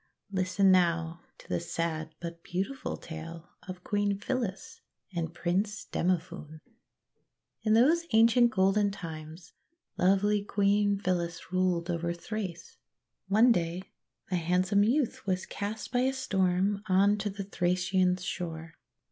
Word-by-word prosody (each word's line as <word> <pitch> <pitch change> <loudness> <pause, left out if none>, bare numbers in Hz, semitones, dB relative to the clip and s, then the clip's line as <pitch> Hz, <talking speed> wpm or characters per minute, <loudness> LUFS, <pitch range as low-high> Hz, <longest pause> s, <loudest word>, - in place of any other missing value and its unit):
Listen, 190 0 +3
now, 170 -2 +2 0.2
to - - -16
the - - -1
sad 160 -2 -3
but 170 -1 -7
beautiful 195 +12 -3
tale 165 +1 -9 0.2
of 180 -1 -8
Queen 205 -1 0
Phyllis 215 -2 -4 0.3
and 165 -1 -2
Prince 190 +5 -1
Demophoon. 165 -3 -2 1.0
In 215 - +2
those 310 +9 +4
ancient 230 +2 +5
golden 200 -1 +2
times 165 -3 -9 0.5
lovely 200 +2 +3
Queen 205 0 +2
Phyllis 175 -2 -3
ruled 180 -2 +1
over 170 0 -1
Thrace. 185 -2 -6 0.5
One 220 +5 +5
day 175 -2 0 0.5
a 180 - +2
handsome 180 +4 +2
youth 240 -1 0
was 185 -1 0
cast 205 +2 -5
by 245 - +1
a 260 +1 +2
storm 195 -4 +1
on 200 +3 +4
to 205 +1 -1
the 200 0 -5
Thracian 180 -1 +1
shore. 165 -3 -5
185 Hz, 125 wpm, -29 LUFS, 170-205 Hz, 1.0 s, ancient